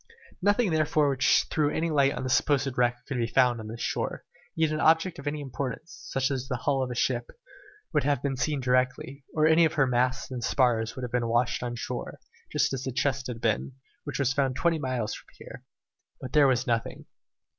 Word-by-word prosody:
Nothing 205 +1 +2
therefore 155 -2 +2
which 135 +1 +3
threw 150 -2 +2
any 160 +2 -1
light 140 -2 +3
on - - -5
the 130 - -2
supposed 135 -2 +2
wreck 120 0 0
could 135 - -4
be 115 -1 0
found 125 -1 +3
on 110 - -7
this 115 +2 -7
shore, - - -2 0.3
yet 160 -1 +1
an 155 - -1
object 165 +2 +3
of 145 - -8
any 150 0 -2
importance, 140 +4 -6
such 135 +1 0
as 130 -1 -3
the 130 - -2
hull 135 +3 0
of 130 - -2
a 125 - -5
ship, 120 0 0 0.6
would 150 - +2
have 140 -2 0
been 140 -2 -1
seen 140 +1 -1
directly, 130 +2 0
or 155 -1 +3
any 160 +2 +5
of 160 - +2
her 145 -4 +3
masts 125 +1 0
and 125 -2 -4
spars 115 -3 +1
would 130 - -6
have 120 - -4
been 120 -1 0
washed 120 +1 +1
on 120 -1 -3
shore, 120 +1 -5 0.3
just - - +1
as 130 - -3
the 130 - -3
chest 130 +1 -1
had 120 -2 -6
been, 115 +4 0 0.3
which 145 - -5
was 135 -2 +1
found 135 -2 0
twenty 160 +3 +1
miles 130 -6 -2
from - - -10
here. - - -11 0.6
But 130 - -8
there 150 -2 +6
was 130 -1 +1
nothing. 115 -3 -2
130 Hz, 220 wpm, -27 LUFS, 125-145 Hz, 0.6 s, there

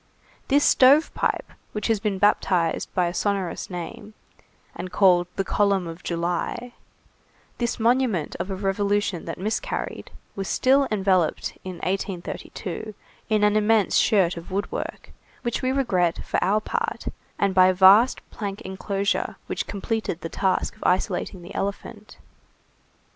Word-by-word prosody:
This 285 +2 +3
stove 280 +5 +5
pipe, - - -1 0.2
which 210 - -3
has 225 -2 +2
been 205 -2 -1
baptized 185 -4 +1
by 180 - +3
a 175 - -2
sonorous 195 -3 -2
name, 185 +4 -7 0.6
and 185 - -6
called 180 -3 +4
the 195 - 0
column 200 -1 +1
of 165 +1 -8
July, 175 +8 -3 0.9
this 240 -1 -1
monument 230 - +1
of 185 - -3
a 190 - -2
revolution 200 -1 0
that 165 - -5
miscarried, 220 - -3 0.3
was 195 -1 -4
still 270 +1 +3
enveloped 190 -5 +1
in 185 - -5
1832, 190 +1 -4 0.3
in 215 -1 +2
an 210 0 +4
immense 215 -1 +3
shirt 185 -5 +3
of 170 - -8
woodwork, 195 +2 -4 0.3
which 240 -2 -2
we 255 -1 +1
regret, 185 -11 +1
for - - 0
our 200 +4 +3
part, 465 - -3 0.3
and 200 -1 +1
by 185 -1 +6
a 185 - +4
vast 200 +7 +6
plank 200 -2 -5
enclosure, 195 +1 -2
which - - -3
completed 205 -3 -3
the 165 - -5
task 190 +3 0
of 215 - -11
isolating 180 0 0
the 180 - -10
elephant. 205 +2 -5
200 Hz, 145 wpm, -24 LUFS, 185-215 Hz, 0.9 s, by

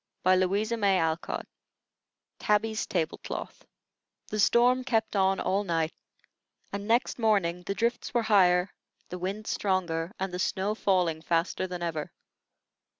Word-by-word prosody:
TABBY'S 185 +4 +2 2.1
TABLE 165 -4 -1
CLOTH - - -7 0.6
The 215 - -3
storm 245 +4 +4
kept 225 -3 0
on 190 0 +2
all 195 +2 0
night, 165 -3 -1 0.8
and 200 +1 -4
next 235 +2 +1
morning 195 -6 +2
the 195 - -1
drifts 235 +3 -1
were 240 -1 +1
higher, 185 -3 +4 0.4
the 180 - -6
wind 195 +4 -4
stronger, 175 -5 -1
and 190 -1 -3
the 180 - -3
snow 195 +2 0
falling 180 -7 +1
faster 170 +3 0
than 180 -1 -5
ever. 160 -3 -3
190 Hz, 120 wpm, -28 LUFS, 180-215 Hz, 2.1 s, storm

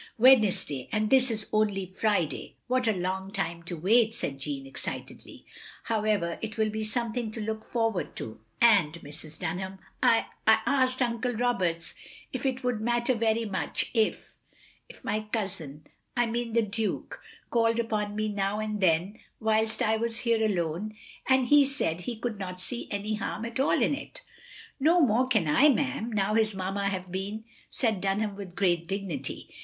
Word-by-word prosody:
"Wednesday, 215 - +4
and 215 0 0
this 260 -1 +5
is 215 -2 -2
only 205 -3 +2
Friday. 190 -3 -1
What 255 0 +1
a - - +5
long 190 0 -2
time 170 -5 -2
to 175 0 -5
wait," 220 +6 +3
said 135 -11 -3
Jeanne, 135 0 -4
excitedly. 135 - -7 0.4
"However, 210 -6 0
it 220 -1 -5
will 215 -1 +2
be 220 0 -3
something 235 +1 -2
to 220 - -6
look 220 0 -3
forward 225 -5 -1
to. 110 - -7 0.2
And, 200 -10 +5
Mrs. 155 0 -10
Dunham, 190 +2 -3 0.2
I - - +4
— - - -39
I - - +6
asked 260 -2 +2
Uncle 240 +1 -1
Roberts 195 -8 0 0.4
if - - -1
it 260 0 -2
would 245 -3 0
matter 240 +2 +1
very 225 0 +1
much 195 -3 -2
if 220 -3 0 0.3
— - - -29
^if - - -18
my 215 0 -2
cousin 165 -9 -4 0.2
— - - -22
I 240 - +4
mean 235 0 -2
the 230 0 +4
Duke— 215 +1 -3 0.3
called 230 -1 +3
upon 210 -3 -1
me 215 0 0
now 200 0 -1
and 215 -1 -2
then, 180 +4 +2 0.2
whilst 220 0 +1
I 220 0 +2
was 230 +1 -2
here 230 -1 +3
alone 190 +1 -1 0.2
— - - -15
^and 260 -1 +5
he 290 -1 +8
said 265 - -1
he 230 +4 -5
cotild 225 -3 -3
not 180 -1 -5
see 235 +6 -4
any 205 +1 -2
harm 215 +1 -3
at 235 +2 -4
all 270 - +3
in - - +2
it. 280 - -7 0.2
" 485 +1 -16
" - - -19
No 325 +6 +5
more 255 -3 +4
can 220 -10 +2
I, 255 - +6
ma'am, 265 -4 0
now 205 -1 +1
his 220 -2 +2
mamma 195 +1 -1
have 185 -2 -4
been," 200 +4 -4 0.3
said 220 -7 0
Dunham, 200 +1 0
with 195 -3 -8
great 175 -3 +1
dignity. 195 -3 -4
215 Hz, 185 wpm, -28 LUFS, 190-235 Hz, 0.4 s, he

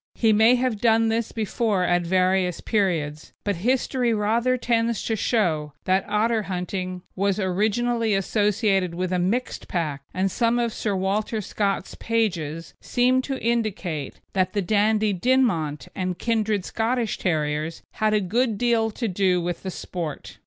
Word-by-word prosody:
He 225 -2 +3
may 220 +4 +6
have 250 -4 -1
done 225 -1 +4
this 225 0 -1
before 215 -3 0
at 175 0 +2
various 185 0 +1
periods, 165 -8 -1
but 200 -3 -1
history 245 +2 +1
rather 230 +5 +1
tends 230 -2 0
to 225 - 0
show 165 - 0
that 190 +1 +1
otter 220 +2 +2
hunting 185 -1 -4
was 200 +1 0
originally 215 +4 +1
associated 195 -2 +1
with 185 +1 -2
a 180 - +1
mixed 230 +8 -1
pack, 155 -6 -2
and 190 +1 0
some 235 +3 +1
of 235 -2 0
Sir 205 -3 -2
Walter 200 +4 -1
Scott's 200 0 -2
pages 170 -9 -2
seem 255 +1 +2
to 270 0 -4
indicate 200 - -2
that 185 -1 +1
the 205 - +1
Dandie 215 +2 +2
Dinmont 175 - +1
and 185 -1 -3
kindred 215 -3 0
Scottish 230 0 -1
terriers 155 -1 -1
had 215 0 +1
a - - +4
good 220 +4 0
deal 230 -1 +2
to 230 +2 -3
do 185 -2 +2
with 175 0 -3
the 190 - -4
sport. 170 -4 -6
205 Hz, 150 wpm, -24 LUFS, 180-230 Hz, -, may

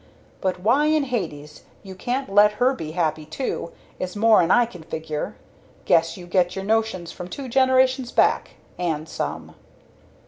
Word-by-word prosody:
But 185 -2 -1
why 250 +10 +3
in 310 -1 +3
Hades 155 - -4 0.2
you 190 -2 -9
can't 250 +8 -3
let 210 +1 +6
her 250 +5 +2
be 155 -11 -6
happy, 160 -3 -1
too, 255 - -4 0.3
is 185 +1 -4
more'n 215 -5 +4
I 240 +4 +5
can 185 -7 -11
figure! 155 -1 -5 0.5
Guess 165 +1 +3
you 180 - -9
get 175 0 +1
your 195 0 -4
notions 220 -5 0
from 180 - -8
two 265 +8 -7
generations 260 0 +3
back - - +2 0.2
and 160 -3 -2
some!" - - -5
195 Hz, 160 wpm, -23 LUFS, 170-250 Hz, 0.5 s, let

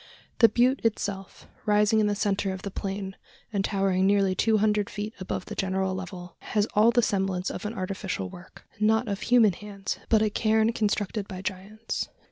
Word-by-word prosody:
The 230 - +8
butte 250 +4 +2
itself, 200 -3 -2 0.2
rising 210 +1 +4
in 210 - +3
the 205 - 0
centre 200 -1 0
of 190 0 -6
the 200 - -4
plain, 195 0 -4 0.4
and 200 -1 +1
towering 195 -1 +1
nearly 200 -1 +3
two 220 +4 +2
hundred 210 -1 +1
feet 210 +1 -5
above 185 -1 -4
the - - -7
general 190 0 -1
level, 185 -1 -7
has 210 -1 0
all 215 +2 +5
the 240 0 +3
semblance 190 -3 0
of - - -5
an 225 - -6
artificial 185 - -3
work 175 - -13
not 220 +2 +3
of 200 -1 -3
human 230 -5 +5
hands, 200 +1 -6
but 220 -1 +4
a 215 - +1
cairn 220 +1 +2
constructed 210 -1 -1
by 185 -1 -7
giants. 200 +4 -4
205 Hz, 185 wpm, -27 LUFS, 190-215 Hz, 0.4 s, The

